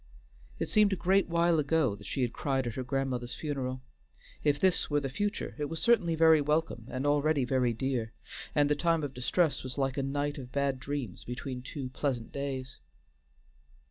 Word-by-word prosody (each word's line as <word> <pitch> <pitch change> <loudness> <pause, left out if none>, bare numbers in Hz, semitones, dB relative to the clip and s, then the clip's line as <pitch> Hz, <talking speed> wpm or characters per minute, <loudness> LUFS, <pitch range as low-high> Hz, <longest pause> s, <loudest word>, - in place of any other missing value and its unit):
It - - -2
seemed 210 -2 +4
a - - +2
great 190 +1 +2
while 170 -1 +3
ago 150 -5 +2
that 100 0 -12
she 135 - -1
had 120 - -1
cried 135 -2 -1
at 120 - -3
her 130 - -3
grandmother's 125 -1 -2
funeral. 130 -4 -3 0.6
If 145 -1 +2
this 190 -2 +2
were 145 -1 +2
the 135 -2 -4
future 205 +8 -2
it 150 - 0
was 160 +2 -4
certainly 190 -9 +3
very 160 -1 +6
welcome 150 -6 0
and 130 +3 -3
already 145 -1 +2
very 125 -1 +2
dear, 115 -1 -2 0.4
and 145 -1 +4
the 150 - +3
time 165 0 +1
of 140 -2 -3
distress 145 +6 +1
was 130 -1 -6
like 135 -1 0
a - - +1
night 145 +2 -2
of 125 -2 -9
bad 140 -2 0
dreams 130 -7 -4
between 125 +1 -5
two 130 0 -6
pleasant 125 -3 -2
days. 135 -2 -4
140 Hz, 190 wpm, -30 LUFS, 130-155 Hz, 0.6 s, very